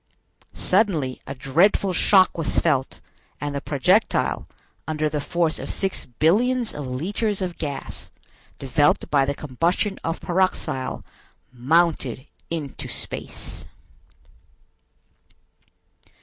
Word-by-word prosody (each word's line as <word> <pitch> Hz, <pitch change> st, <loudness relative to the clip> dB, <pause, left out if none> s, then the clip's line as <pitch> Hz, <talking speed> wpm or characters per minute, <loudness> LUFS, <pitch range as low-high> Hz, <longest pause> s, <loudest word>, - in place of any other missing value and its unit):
Suddenly 175 Hz, -, +1 dB
a 135 Hz, -, -5 dB
dreadful 180 Hz, +8 st, +3 dB
shock 190 Hz, +1 st, +5 dB
was 165 Hz, -3 st, -2 dB
felt, 135 Hz, -5 st, +1 dB, 0.4 s
and 145 Hz, 0 st, -3 dB
the 140 Hz, -, -3 dB
projectile, 135 Hz, -1 st, +2 dB, 0.4 s
under 155 Hz, -1 st, 0 dB
the 150 Hz, -1 st, -2 dB
force 165 Hz, +1 st, 0 dB
of -, -, -6 dB
six 195 Hz, -1 st, -1 dB
billions 220 Hz, -, +2 dB
of 145 Hz, -3 st, -5 dB
litres 195 Hz, -, -1 dB
of 180 Hz, -3 st, -4 dB
gas, 140 Hz, -3 st, -5 dB, 0.5 s
developed 140 Hz, +2 st, +2 dB
by 140 Hz, -2 st, +4 dB
the 140 Hz, +1 st, -1 dB
combustion 170 Hz, -, -1 dB
of 165 Hz, 0 st, -2 dB
pyroxyle, 175 Hz, -7 st, -1 dB, 0.5 s
mounted 135 Hz, -1 st, +1 dB, 0.2 s
into 155 Hz, -5 st, -4 dB
space. -, -, -6 dB
155 Hz, 105 wpm, -24 LUFS, 135-185 Hz, 0.5 s, shock